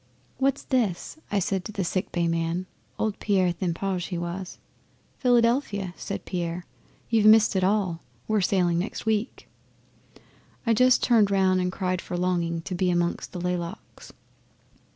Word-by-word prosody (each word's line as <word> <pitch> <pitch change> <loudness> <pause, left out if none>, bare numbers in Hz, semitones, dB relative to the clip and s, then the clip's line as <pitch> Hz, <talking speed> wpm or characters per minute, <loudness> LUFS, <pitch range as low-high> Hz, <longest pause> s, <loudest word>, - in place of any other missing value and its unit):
'"What's 275 +1 +1
this?" 235 - -1
I 205 - +1
said 190 0 0
to - - -5
the 200 -2 -2
sick 185 +2 -2
bay 170 -1 0
man 165 +2 -1 0.3
Old 215 -2 -1
Pierre 185 -4 +2
Tiphaigne 185 +1 -2
he 175 0 -4
was. 175 +2 -5 0.6
"Philadelphia," 235 -6 +2
says 200 - -5
Pierre. 175 -1 -3 0.5
"You've 220 -2 +4
missed 215 -1 +6
it 190 - +2
all. 185 -4 +1 0.3
We're 215 -1 +2
sailing 180 -2 +2
next 195 +5 -4
week." 220 +2 -1 1.2
'I 230 - +3
just 255 +2 +4
turned 220 -5 +4
round 190 -2 +3
and 180 0 -1
cried 185 -1 -2
for 180 - -5
longing 170 -2 0
to 185 - -5
be 180 +1 +1
amongst 175 0 -1
the 180 - -6
laylocks. 175 0 -5
185 Hz, 150 wpm, -26 LUFS, 175-215 Hz, 1.2 s, missed